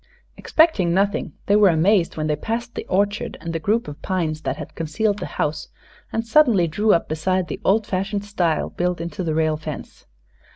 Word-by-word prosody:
Expecting 205 - +2
nothing, 200 +1 0
they 200 - +3
were 210 -2 +6
amazed 170 +2 +2
when 155 - -1
they 150 -1 +1
passed 230 +8 -4
the - - -6
orchard 205 +2 0
and 165 -1 -5
the 165 - -1
group 215 +8 0
of 145 0 -9
pines 160 -5 -2
that - - -3
had - - -8
concealed 200 +6 -1
the - - -4
house 150 0 -1 0.4
and 225 +1 -2
suddenly 230 - +4
drew 210 +7 +1
up 170 - +2
beside 180 +4 -1
the - - -5
old 210 +2 +3
fashioned 200 +2 -2
stile 175 -6 0
built 180 -1 -1
into 170 +2 -4
the 160 -2 -1
rail 155 -1 +1
fence. 155 -1 -8
185 Hz, 195 wpm, -22 LUFS, 160-210 Hz, 0.4 s, were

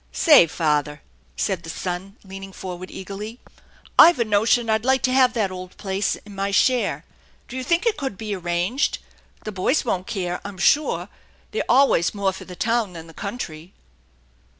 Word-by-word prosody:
" - - -36
Say, 300 - +6
father," 150 -2 -1 0.3
said 185 -3 -1
the 165 - -10
son, 185 +3 -5
leaning 195 0 -9
forward 185 -1 -7
eagerly, 205 +5 -7 0.6
"Pve 345 - +9
a 235 - +1
notion 220 +3 +2
I'd 220 0 +1
like 265 +1 +2
to 255 - +2
have 255 -1 +4
that 210 -5 0
old 185 0 -9
place 195 0 -1
in 205 - -14
my 195 0 -2
share. 245 +5 +1 0.4
Do 250 - -9
you 260 - -3
think 340 - +1
it 455 -2 +2
could 270 -9 -4
be 215 -2 -4
arranged? 175 +8 -1 0.5
The 215 - -5
boys 210 +10 0
won't 185 -5 -2
care, 180 -3 -3
I'm 200 -1 -8
sure; 295 - +2 0.4
they're 440 - -1
always 250 -9 +4
more 195 -2 0
for 190 - -9
the 180 - -10
town 225 -1 0
than 165 -1 -9
the 165 - -14
country." 180 -4 -6
200 Hz, 180 wpm, -23 LUFS, 180-240 Hz, 0.6 s, Pve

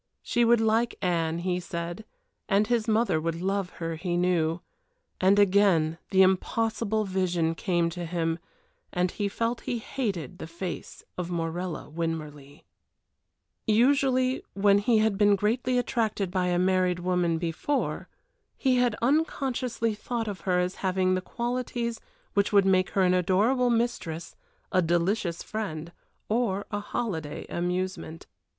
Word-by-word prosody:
She 240 - +1
would 235 0 +5
like 225 +1 +2
Anne, 165 -2 +1
he 180 +1 -1
said, 175 +3 -5 0.4
and 205 +1 +4
his 235 -1 0
mother 220 -7 +2
would 165 +1 -2
love 195 0 -1
her, 165 -1 -4
he 175 +1 -2
knew. 175 -2 +1 0.6
And 190 +2 +4
again 185 -5 +4
the 190 0 +6
impossible 215 +3 +1
vision 180 -4 0
same 170 -2 0
to 175 0 -5
him, 165 -1 -1 0.5
and 180 0 0
he 205 - -2
felt 230 +4 -2
he 240 - -2
hated 200 - -4
the - - -6
face 170 +2 -6 0.2
of 180 -1 -3
Morella 170 +1 -3
Winmarleigh. 150 -3 -5 1.0
Usually 255 +3 +3
when 200 0 +4
he 225 +2 +3
had 215 -2 +2
been 205 -1 +5
greatly 240 +5 0
attracted 220 -5 0
by 185 -1 0
a 175 -1 +1
married 185 -1 +2
woman 175 -2 +1
before, 170 - -2 0.5
he 260 -2 +2
had 245 -3 +2
unconsciously 255 -5 0
thought 225 +2 -3
of 195 -4 -5
her 180 - +3
as 180 +1 -1
having 185 -1 +2
the 185 - 0
qualities 235 +1 -3 0.3
which 200 0 +2
would 200 -2 +5
make 185 -1 +3
her 195 - +2
an 180 0 +4
adorable 210 +8 +2
mistress, 225 -9 -2 0.4
a 185 - +3
delicious 175 +1 0
friend, 170 -7 -5 0.4
or 210 -3 0
a 205 - -1
holiday 185 -9 -4
amusement. 180 -1 -3
190 Hz, 145 wpm, -27 LUFS, 175-225 Hz, 1.0 s, the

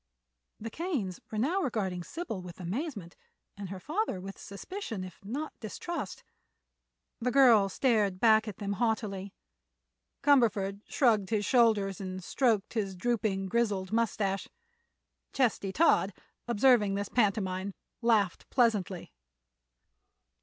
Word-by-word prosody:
The 225 +1 -6
Kanes 275 - -3
were 215 - -5
now 320 - +1
regarding 195 - -2
Sybil 225 - -5
with 180 0 -10
amazement 200 - -4 0.4
and 200 -2 -7
her 190 0 -6
father 310 - -2
with 195 +1 -7
suspicion 220 - -6
if 185 0 -11
not 275 +10 -4
distrust. 335 +10 -5 1.0
The 250 +1 0
girl 240 -7 +6
stared 205 -4 +1
back 220 0 +5
at 205 - -6
them 200 -1 -3
haughtily; 200 -3 -1 0.9
Cumberford 205 -8 +3
shrugged 220 -7 +2
his 210 -2 0
shoulders 215 -6 +3
and 185 -1 -5
stroked 225 -2 +1
his 200 -4 -2
drooping, 200 -1 0
grizzled 205 -3 0
mustache. 210 -4 0 0.9
Chesty 230 -7 +1
Todd, 205 - +3 0.3
observing 230 -3 +4
this 200 0 -3
pantomime, 200 -4 0 0.3
laughed 220 -6 +1
pleasantly. 205 - +1
210 Hz, 115 wpm, -30 LUFS, 195-240 Hz, 1.0 s, girl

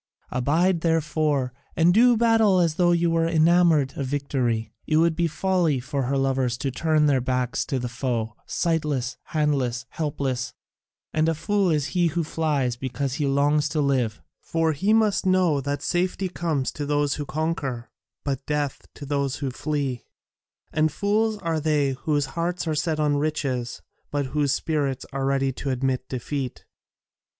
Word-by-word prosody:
Abide, 160 +8 +2
therefore, 155 -5 +1 0.2
and 170 +2 +4
do 240 +3 +5
battle 225 -4 +4
as 170 -3 +2
though 175 +2 +3
you 170 -1 +2
were 165 0 +2
enamoured 165 -3 +3
of 140 - -3
victory. 130 -5 -1
It 155 - +2
would 165 0 +3
be 170 0 +1
folly 165 -3 +1
for 135 +1 -2
her 135 +2 0
lovers 135 -3 0
to 135 +2 -2
turn 155 +3 +2
their 140 -3 +3
backs 125 -1 -1
to 135 - -1
the 125 -1 -2
foe, 120 -2 -2
sightless, 150 -6 -1
handless, 135 -6 0
helpless, 140 -4 -3 0.6
and 155 +1 +2
a 165 - 0
fool 200 +3 +1
is 150 -4 +1
he 175 -2 +3
who 170 +1 -1
flies 145 -6 -1
because 130 +1 -3
he 145 - +1
longs 145 +2 +2
to 160 -1 -1
live, 130 -6 0 0.2
for 165 -1 0
he 190 +9 0
must 215 -3 +3
know 180 -6 +3
that 145 +1 -3
safety 185 +2 0
comes 160 -7 -1
to 145 -1 -5
those 145 -1 +1
who 150 - -3
conquer, 140 -6 -3 0.3
but 135 -2 -2
death 145 -2 -2
to 145 - -8
those 140 -1 -1
who 135 -3 -3
flee; 140 -3 -3 0.7
and 155 0 +2
fools 210 +6 +1
are 165 -1 0
they 150 -3 +1
whose 145 +2 0
hearts 170 +1 -2
are 160 - +1
set 155 +1 -1
on 145 -1 +2
riches, 140 -5 -2 0.3
but 145 -1 -1
whose 145 -2 +2
spirits 140 -3 -1
are 135 0 -1
ready 135 -1 +1
to 135 +2 -5
admit 130 0 -1
defeat. 130 +1 -4
150 Hz, 165 wpm, -24 LUFS, 135-165 Hz, 0.7 s, do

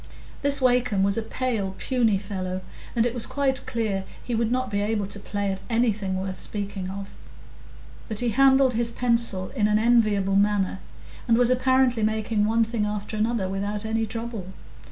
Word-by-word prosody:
This 280 0 +2
Wakem 245 -6 +3
was 200 0 +2
a 230 - 0
pale, 220 -5 -2
puny 235 -6 +1
fellow, 190 -2 -4 0.3
and 230 -1 +3
it 240 - 0
was 240 -3 -2
quite 270 -1 0
clear 215 -4 -1 0.2
he 245 - -4
would 230 0 0
not 255 -1 -1
be 200 0 0
able 210 -1 0
to 200 +1 -6
play 200 0 -2
at 190 0 -5
anything 215 -5 0
worth 190 0 -4
speaking 200 -2 -4
of; 195 +1 -6 1.0
but 215 - -4
he 240 +2 +1
handled 265 +2 +4
his 230 +1 +1
pencil 235 -6 +1
in 210 -6 +1
an 210 0 +3
enviable 215 -4 +3
manner, 200 -2 +1 0.5
and 230 -1 +4
was 245 0 +4
apparently 255 -2 +3
making 215 0 +1
one 225 +2 +3
thing 225 -1 -2
after 210 +1 -3
another 215 -2 0
without 200 +2 -3
any 225 0 0
trouble. 225 -3 -5
220 Hz, 175 wpm, -25 LUFS, 200-240 Hz, 1.0 s, handled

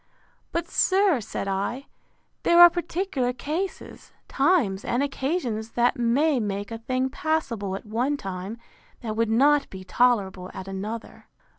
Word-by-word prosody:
—But, 335 0 -2
sir, 375 - +3
said 200 - -5
I, 200 +8 -2 0.6
there 340 0 +4
are 345 0 +10
particular 335 -8 -2
cases, 320 +9 -5
times, 270 - +2
and 245 +3 0
occasions, 265 -6 -2
that 245 +1 +2
may 265 +5 +2
make 205 -1 -3
a 225 - -5
thing 255 +3 -1
passable 245 -12 -2
at 195 - -8
one 245 +7 -1
time, 195 0 -6 0.4
that 220 -3 -4
would 230 0 +1
not 280 +5 +3
be 190 -1 -9
tolerable 190 -4 +1
at 190 - -7
another. 210 +4 -6
245 Hz, 140 wpm, -25 LUFS, 205-295 Hz, 0.6 s, are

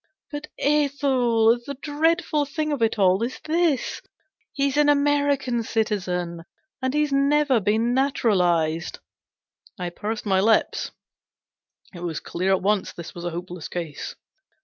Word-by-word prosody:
But, 295 +1 -6
Ethel, 265 -6 +2
the 280 +3 -6
dreadful 310 +1 +1
thing 305 +2 -2
of 285 -4 -2
it 225 0 +2
all 190 0 +3
is 240 +3 -3
this 320 -3 0 0.5
he's 275 -1 0
an 295 0 +4
American 285 -4 +2
citizen, 185 -7 -2 0.4
and 260 +2 -1
he's 300 -1 +1
never 280 -2 +3
been 220 +4 +1
naturalized! 180 - +1 0.4
" - - -69 0.3
I 175 -1 -3
pursed 215 +5 -4
my 190 -2 +2
lips. 220 +3 +2 1.0
It 175 - -9
was 170 -3 -3
clear 185 +3 -2
at 190 -1 +2
once 205 -1 +1
this 170 -1 -9
was 175 0 -7
a - - 0
hopeless 175 -1 -6
case. 165 -4 -5
235 Hz, 140 wpm, -24 LUFS, 185-285 Hz, 1.0 s, an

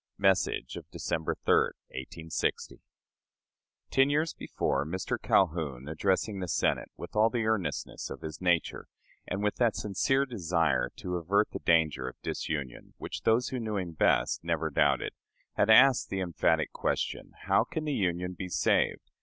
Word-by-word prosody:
(Message 95 -2 +1
of - - -10
December 80 - -2
3, - - +5 0.4
1860.) 80 +5 -4 1.1
Ten 135 +1 +4
years 155 +3 +1
before, 70 - -1
Mr. 90 +5 -3
Calhoun 75 -8 +1
addressing 95 +6 0
the 90 - -3
Senate 85 - 0
with - - -9
all 110 +1 +5
the 115 -2 -1
earnestness 110 -4 -2
of - - -8
his 80 +1 -7
nature 90 -3 0 0.4
and 100 +3 -3
with 105 - 0
that 120 -3 +2
sincere 110 +7 +1
desire 85 - 0
to 90 -1 -4
avert 100 +5 +1
the - - -5
danger 80 -6 +2
of - - -16
disunion 70 -6 -4
which - - -6
those 115 +3 +2
who 130 - -3
knew 110 -3 -2
him 90 -3 -3
best 80 - +2
never 80 -1 -1
doubted, - - +2 0.4
had 105 - +1
asked 130 +3 +6
the 95 - -2
emphatic 80 -3 +1
question, - - -2
"How - - +3
can 160 -2 -4
the 150 - -1
Union 90 -4 -1
be 90 +1 -6
saved?" - - +1
90 Hz, 155 wpm, -29 LUFS, 80-110 Hz, 1.1 s, asked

